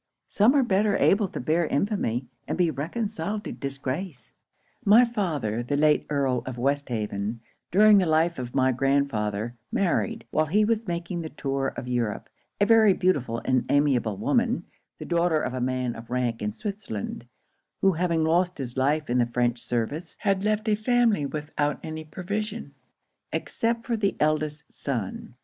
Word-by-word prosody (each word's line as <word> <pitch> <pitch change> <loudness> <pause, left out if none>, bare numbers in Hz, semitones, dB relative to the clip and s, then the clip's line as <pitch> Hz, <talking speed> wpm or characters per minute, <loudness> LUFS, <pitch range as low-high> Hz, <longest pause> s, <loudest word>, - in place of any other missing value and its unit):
Some 225 +7 +3
are 275 - +5
better 205 -2 +2
able 200 0 +3
to - - -6
bear 160 +5 +1
infamy, 140 - 0 0.2
and - - -2
be 175 -3 +3
reconciled 200 - -3
to - - -5
disgrace. 140 - -5 0.5
'My 220 +5 +7
father, 155 - -2
the 135 +4 -1
late 150 0 +3
Earl 135 -4 +1
of 130 -2 -5
Westhaven, 115 -5 -2 0.3
during 210 +2 +6
the 185 - +1
life 160 +1 +2
of 125 -1 -6
my 130 0 +3
grandfather, 120 -5 0 0.2
married, 190 -4 0
while 155 0 +2
he 210 +7 +3
was 225 0 0
making 170 0 -3
the 160 - -5
tour 135 -2 -2
of 125 - -5
Europe, 120 -4 -2 0.3
a 205 - +4
very 220 -2 +6
beautiful 140 -12 0
and 130 -2 +2
amiable 130 -8 +2
woman, - - +1 0.3
the - - -7
daughter 170 -2 +2
of 125 - -2
a 130 - -3
man 125 -1 -1
of 115 +1 -10
rank 120 -2 -1
in 105 0 -1
Switzerland; 120 - -5 0.5
who 195 - +5
having 170 -2 0
lost 175 +3 +2
his 125 -3 -5
life 145 +3 +1
in 125 +1 +1
the 120 - +3
French 120 0 0
service, 125 +9 -3
had 195 -2 +1
left 215 +1 0
a 215 - +3
family 215 - +2
without 150 0 -2
any 155 0 -5
provision, 200 +1 -5 0.6
except 230 0 -1
for 240 - 0
the 200 -3 0
eldest 155 0 0
son. 120 -3 -4
155 Hz, 165 wpm, -26 LUFS, 125-195 Hz, 0.6 s, My